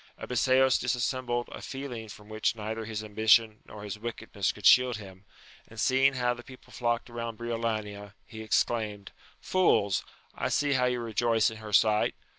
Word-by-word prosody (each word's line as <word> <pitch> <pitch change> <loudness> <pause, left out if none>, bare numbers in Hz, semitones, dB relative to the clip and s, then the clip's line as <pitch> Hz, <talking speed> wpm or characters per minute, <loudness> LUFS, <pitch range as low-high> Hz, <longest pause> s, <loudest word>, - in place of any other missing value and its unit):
Abiseos 130 +1 +3
dis 120 -1 0
sembled 120 0 -1
a - - -8
feeling 125 -5 -6
from 105 +1 -12
which 110 +1 -1
neither 110 +1 -5
his 110 -1 -5
ambition 110 +1 +3
nor 105 -1 -10
his 105 0 -6
wickedness 110 -3 -3
could 105 - -11
shield 125 -3 +6
him, 95 -2 -12 0.4
and - - -12
seeing 135 +1 +3
how 125 -1 +1
the 120 - -10
people 130 +1 -15
flocked 120 -1 -1
round 115 -2 -6
Briolania, 110 -3 -4
he 110 -1 -10
exclaimed, 110 -2 -1 0.3
Fools, 100 - +2 0.3
I - - -2
see 145 -1 +1
how 130 -1 +2
you 125 -1 0
rejoice 115 0 +1
in 110 - -9
her 110 -1 -9
sight! 105 0 +3
115 Hz, 170 wpm, -28 LUFS, 105-125 Hz, 0.4 s, shield